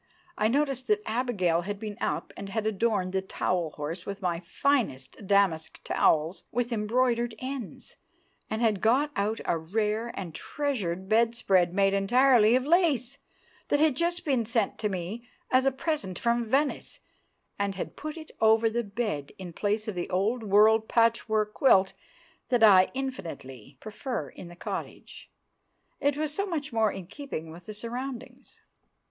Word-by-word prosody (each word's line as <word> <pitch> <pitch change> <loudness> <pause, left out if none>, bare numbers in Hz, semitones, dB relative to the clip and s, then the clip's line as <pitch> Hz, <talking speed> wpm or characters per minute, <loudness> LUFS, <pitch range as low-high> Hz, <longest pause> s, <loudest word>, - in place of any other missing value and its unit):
I 215 - +2
noticed 270 +1 0
that 425 0 +2
Abigail 210 -9 0
had 205 +3 -4
been 210 -1 -5
up - - -2
and 200 - -7
had 215 +2 -2
adorned 205 -3 0
the 190 - +1
towel 180 -3 -1
horse 160 +4 -4
with 200 +1 -6
my 175 -2 -1
finest 195 - -1
damask 190 -6 +2
towels 160 +4 +1
with 240 +1 -1
embroidered 235 +1 +1
ends, 255 -2 -6 0.5
and 220 +2 -2
had 215 -4 +2
got 265 +7 +3
out 210 +3 -1
a 165 - 0
rare 210 +6 -1
and 175 -5 -6
treasured 190 - -3
bedspread 215 -5 +3
made 195 0 +3
entirely 235 +3 +5
of 255 0 +1
lace, 285 -6 +2 0.5
that 290 - +2
had 305 -3 +3
just 345 +4 -1
been 265 -6 +2
sent 225 -2 -1
me 205 +4 -3 0.2
as 260 +1 +4
a - - +4
present 265 - -3
from 235 0 +1
Venice, 280 +4 0 0.6
and 200 -1 -1
had 185 - -5
put 310 +2 -6
it 315 -1 -10
over 220 0 +4
the 235 +1 -1
bed 200 -10 -3
in 180 -3 -8
place 210 +4 -1
of 215 - -2
the 175 -1 -4
old 205 +7 0
world 215 +1 +4
patchwork 220 -2 +2
quilt 195 -8 +4 0.6
that 245 -3 +3
I 190 -3 +7
infinitely 170 - -6
prefer 215 - -5
in 180 - -11
the 175 - -12
cottage; - - -7 0.7
it 285 0 +1
was 305 -1 -2
so 400 +5 -1
much 295 -8 -3
more 220 -2 +2
in 190 -2 -7
keeping 185 - -7
with 170 +2 -13
the 215 - -6
surroundings. 245 +4 -7
220 Hz, 160 wpm, -28 LUFS, 190-255 Hz, 0.7 s, I